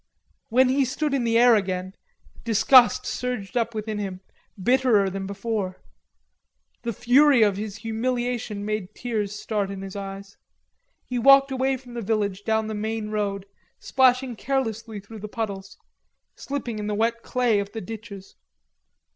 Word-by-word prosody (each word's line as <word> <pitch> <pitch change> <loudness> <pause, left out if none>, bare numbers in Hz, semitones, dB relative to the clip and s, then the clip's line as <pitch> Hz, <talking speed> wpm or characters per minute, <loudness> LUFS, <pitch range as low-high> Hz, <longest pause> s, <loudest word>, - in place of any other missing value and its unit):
When 255 +2 +4
he 275 +2 +3
stood 285 +3 -2
in 260 -3 0
the 230 0 +3
air 240 0 +7
again, 185 -3 -1 0.5
disgust 235 +3 +5
surged 250 -3 -4
up 230 -1 0
within 215 0 -3
him, 190 -2 -5 0.4
bitterer 230 -3 +3
than 195 0 -4
before. 200 -2 -3 1.0
The 235 - -2
fury 250 +3 +5
of 205 -2 +2
his 205 0 -5
humiliation 235 -2 -2
made 215 -1 -3
tears 215 -4 -3
start 205 -3 -2
in 195 -1 -6
his 195 0 -8
eyes. 195 0 -7 0.7
He 250 -1 -3
walked 275 +2 +6
away 265 0 0
from 250 -1 -14
the 235 - -4
village 205 -2 -1
down 220 0 +1
the 220 - -4
main 215 0 -3
road, 200 -2 -2 0.3
splashing 255 -1 +2
carelessly 230 -5 -2
through 215 +2 -11
the 210 - -6
puddles, 200 -3 -5 0.6
slipping 250 -6 -5
in 210 - -4
the 210 - -1
wet 230 +2 0
clay 240 -5 +1
of 200 0 -4
the 225 - -5
ditches. 200 -2 -9
220 Hz, 155 wpm, -24 LUFS, 200-245 Hz, 1.0 s, air